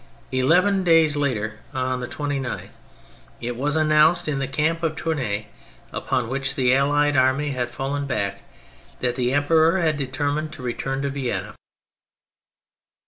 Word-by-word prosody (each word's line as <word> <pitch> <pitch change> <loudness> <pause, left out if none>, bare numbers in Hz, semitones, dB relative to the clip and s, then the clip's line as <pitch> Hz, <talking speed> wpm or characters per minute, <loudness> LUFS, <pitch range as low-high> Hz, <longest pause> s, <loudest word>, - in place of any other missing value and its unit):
Eleven 180 +10 +3
days 165 -3 +4
later, 110 -7 -1 0.2
on 130 0 -1
the 125 - -4
29th, 140 -2 -4 0.7
it 120 +1 -4
was 145 +5 -1
announced 155 +2 +4
in 145 -3 -1
the 135 - -1
camp 155 +5 0
of 160 -2 -1
Tournay, 125 -12 -2 0.5
upon 125 -3 -1
which 135 +2 -2
the 125 -2 +3
Allied 145 +2 +3
army 130 +3 +2
had 125 -2 -2
fallen 140 +3 -3
back, 100 -6 -2 0.6
that 125 -1 0
the 125 0 0
Em 145 +1 +2
peror 165 +4 +4
had 160 -4 +1
determined 145 +3 -2
to 150 -5 -10
return 135 +3 -3
to 140 - -1
Vienna. 135 -3 -3
140 Hz, 145 wpm, -23 LUFS, 130-155 Hz, 0.7 s, days